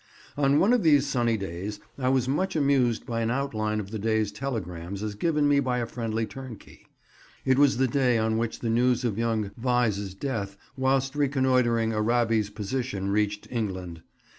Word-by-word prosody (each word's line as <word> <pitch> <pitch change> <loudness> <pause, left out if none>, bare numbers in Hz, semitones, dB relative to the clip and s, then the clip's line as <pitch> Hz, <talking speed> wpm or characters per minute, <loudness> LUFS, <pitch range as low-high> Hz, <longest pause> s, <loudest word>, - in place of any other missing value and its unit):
On 140 0 +3
one 210 +9 +4
of 245 - +3
these 145 -4 +4
sunny 120 -5 +1
days 95 +2 -5 0.2
I 130 -1 +1
was 130 -1 +2
much 185 +8 0
amused 135 -6 +2
by 115 -2 -2
an 115 - 0
outline 110 -5 -1
of 100 -1 -6
the 110 - -4
day's 110 -1 0
telegrams 100 -6 -5
as 105 -1 -3
given 150 +6 +1
me 145 -1 +4
by 130 -2 0
a 120 - -1
friendly 115 -1 -2
turnkey. 130 -3 -11 0.6
It 130 0 +3
was 140 -3 +4
the 130 0 +3
day 125 -1 +2
on 110 0 +1
which 115 -1 -3
the 115 - -1
news 125 +1 +2
of 110 -2 -1
young 110 -3 0
Vyse's 110 -6 0
death 100 -5 -4 0.2
whilst 135 +1 +1
reconnoitring 130 -5 +2
Arabi's 110 -1 +1
position 105 -1 -3
reached 105 0 0
England. 95 -8 -4
115 Hz, 175 wpm, -26 LUFS, 105-130 Hz, 0.6 s, one